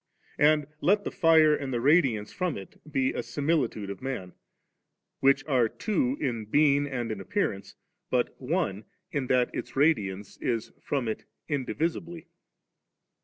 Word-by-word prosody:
And 150 0 +4 0.2
let 205 +3 +3
the - - -3
fire 160 -4 +5
and 135 -2 -4
the 120 - 0
radiance 130 -6 +3
from 180 -4 -1
it 95 - -11
be 130 -2 +1
a - - -3
simili 140 +3 0
tude 100 -2 -6
of 100 - -8
man, 125 -9 -4 0.9
which 135 0 +3
are 125 -6 +2
two 250 - -1
in 115 -4 -2
being 145 +4 +3
and 120 -5 -3
in 105 -3 -4
appearance, 100 - -2 0.3
but 125 -1 0
que 130 - -1 0.3
in 140 -7 -2
that 125 -1 +2
its - - -5
radiance 105 -10 +1
is 115 -2 -2
from 135 -5 -1
it 110 - -4 0.2
indivisibly. 165 +4 -2
135 Hz, 150 wpm, -28 LUFS, 115-155 Hz, 0.9 s, fire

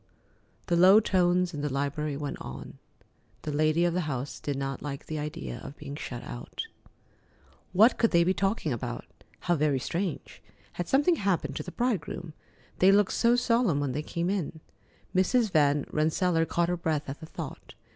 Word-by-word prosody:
The 175 - +1
low 185 +4 +8
tones 180 -3 +2
in 145 - -4
the 145 -1 -2
library 140 +1 -2
went 145 -1 -5
on. 65 +2 -8 0.6
The 155 - -3
lady 155 +3 +2
of 175 - +1
the 175 -3 -1
house 135 0 -4
did 145 -2 -3
not 135 -1 -3
like 140 -2 -6
the 155 -1 -4
idea 70 - -5
of 140 - -9
being 145 -1 -7
shut 125 -5 -6
out. 120 - -6 1.1
What 220 +7 +5
could 230 - +4
they 170 -1 +4
be 185 +2 +2
talking 195 - 0
about? 120 - -5 0.4
How 175 - +1
very 150 -3 +2
strange! 170 +6 -4 0.3
Had 175 - -4
something 290 +5 +3
happened 195 -3 0
to - - -2
the - - -7
bridegroom? 185 -9 -2 0.5
They 190 +1 +7
looked 200 0 +4
so 235 0 +4
solemn 235 - +2
when 145 -2 -1
they 145 +4 -2
came 170 +4 -2
in. 170 -5 -3 0.6
Mrs. 215 +4 +3
Van 145 -3 +3
Rensselaer 165 +2 +1
caught 170 0 +1
her 180 - +1
breath 155 -3 -1
at 135 +2 -6
the 160 - -9
thought. - - -8
165 Hz, 180 wpm, -28 LUFS, 145-185 Hz, 1.1 s, low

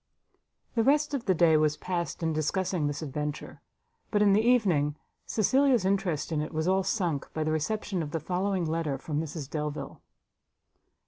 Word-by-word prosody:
The 230 - +2
rest 295 +3 +3
of 265 -4 -2
the 185 - +3
day 165 -1 +5
was 155 0 +2
passed 175 -2 -3
in 160 -1 +1
discussing 160 +1 0
this 145 +2 -3
adventure; 150 +1 -5 0.5
but 210 -1 +2
in 200 -1 +5
the 210 - +4
evening, 190 -12 +3 0.3
Cecilia's 255 0 +3
interest 190 -6 0
in 155 -2 0
it 155 - -4
was 160 +1 -1
all 190 +1 +3
sunk, 175 -8 -1
by 155 - 0
the 155 - 0
reception 185 +4 -1
of 155 - -4
the 165 - -2
following 185 +3 -1
letter 160 -3 -1
from 150 +2 -3
Mrs 155 -3 -6
Delvile. 150 0 -5
165 Hz, 175 wpm, -28 LUFS, 150-200 Hz, 0.5 s, day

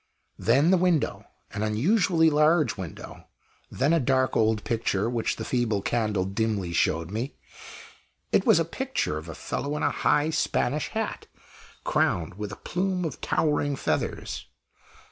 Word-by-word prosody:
Then 130 - +4
the 190 - +4
window 175 -4 +1 0.3
an 105 - -4
unusually 160 - +3
large 150 -3 +3
window. 95 -4 -8 0.4
Then 140 +5 +1
a 165 - +4
dark 130 -1 +1
old 110 -1 +2
picture, 110 -3 0
which 120 -1 -1
the - - -6
feeble 115 -5 0
candle 105 -5 0
dimly 100 -3 -1
showed 85 +1 +1
me. 115 +7 -4 1.0
It - - +3
was - - +5
a - - +1
picture 75 - -2
of 80 +2 -11
a 80 - -7
fellow 145 +1 -3
in - - -3
a - - +2
high 150 +2 +2
Spanish 150 -2 0
hat, 220 -1 -4 0.6
crowned 85 0 +1
with 105 +2 -6
a - - -6
plume 185 0 -2
of 160 - -5
towering 145 -2 +1
feathers. - - -3
120 Hz, 150 wpm, -26 LUFS, 105-155 Hz, 1.0 s, was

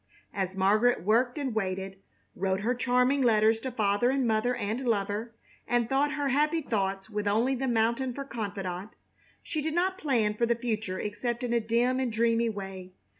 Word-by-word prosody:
As 190 -1 -2
Margaret 210 +4 +3
worked 240 - +2
and 275 -5 -2
waited, 195 -2 -3 0.3
wrote 190 +1 -1
her 235 +4 +1
charming 250 +2 +2
letters 220 -2 +4
to 260 +3 -4
father 215 0 +2
and 265 -1 +1
mother 225 +2 +1
and 220 +1 -2
lover, 215 +1 -1 0.3
and 240 -1 +1
thought 280 +4 +1
her 290 -2 -1
happy 300 +4 +2
thoughts 195 -6 -2
with 210 -1 -2
only 225 +6 +2
the 265 +1 -2
mountain 235 +2 +1
for 275 +3 -5
confidant, 200 -5 -5 0.5
she 310 - -3
did 315 +1 -2
not 375 +2 +1
plan 235 - +1
for 235 +2 0
the 235 - +2
future 220 -5 -3
except 235 +3 -3
in 240 -1 -1
a 235 - +3
dim 235 +3 +1
and 255 -3 -1
dreamy 230 +1 +2
way. 195 -3 -7
230 Hz, 180 wpm, -28 LUFS, 205-250 Hz, 0.5 s, letters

